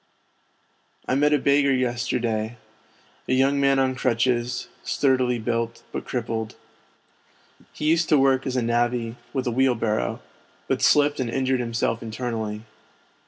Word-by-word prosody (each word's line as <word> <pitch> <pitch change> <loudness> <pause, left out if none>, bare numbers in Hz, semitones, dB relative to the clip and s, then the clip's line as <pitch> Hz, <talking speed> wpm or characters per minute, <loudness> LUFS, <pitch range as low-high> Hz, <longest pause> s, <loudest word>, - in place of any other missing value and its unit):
I - - 0
met 145 +2 +3
a 150 - +4
beggar 140 0 +3
yesterday, 120 -3 -1 0.7
a - - +1
young 135 +2 +3
man 135 0 +3
on 130 -1 +2
crutches, 125 -1 0
sturdily 130 -3 +1
built, 115 0 -2
but - - -5
crippled. 115 -2 -3 1.2
He - - -6
used 160 +1 +2
to 155 - +5
work 135 -1 +2
as 130 - -2
a 125 - +1
navvy, 120 0 0 0.2
with 135 -2 -2
a 120 - 0
wheelbarrow, 115 - 0 0.5
but - - 0
slipped 145 0 +4
and 125 -3 -1
injured 130 +1 0
himself 115 -1 -1
internally. 110 -2 -4
125 Hz, 135 wpm, -24 LUFS, 115-135 Hz, 1.2 s, to